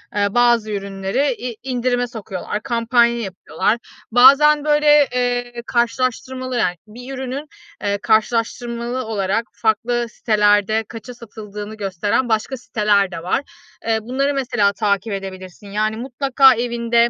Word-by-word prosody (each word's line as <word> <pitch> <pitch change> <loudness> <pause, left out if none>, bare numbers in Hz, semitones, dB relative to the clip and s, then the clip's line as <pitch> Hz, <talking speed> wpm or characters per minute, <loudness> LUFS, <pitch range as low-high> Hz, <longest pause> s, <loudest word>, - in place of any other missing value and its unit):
ııı, 200 -1 +1
bazı 240 -3 +3
ürünleri 200 +7 -1
in 240 -1 -6
indirime 245 -1 0
sokuyorlar, 215 -2 -5
kampanya 235 -1 +2
yapıyorlar. 190 +1 -1 0.3
Bazen 285 +5 +6
böyle, 295 -1 +5
eee, 245 -1 -1
karşılaştırmalı, 255 +2 -1
yani, 180 -6 +1
bir 245 +5 -9
ürünün, 265 +2 -5 0.4
ııı, 200 0 0
karşılaştırmalı 235 +2 0
olarak 210 +1 -1
farklı 225 +3 0
sitelerde 210 -1 +2
kaça 235 +2 -9
satıldığını 215 -2 -9
gösteren 205 +4 -1
başka 220 +4 0
siteler 205 -5 +1
de 165 -1 -7
var. 185 +8 0 0.5
Iıı, 220 -1 +2
bunları 265 +5 -1
mesela 240 -7 +1
takip 205 +1 -1
edebilirsin. 190 0 -8
Yani, 215 +1 -1
mutlaka 265 +1 +3
evinde, 235 0 +1
235 Hz, 125 wpm, -20 LUFS, 210-250 Hz, 0.5 s, Bazen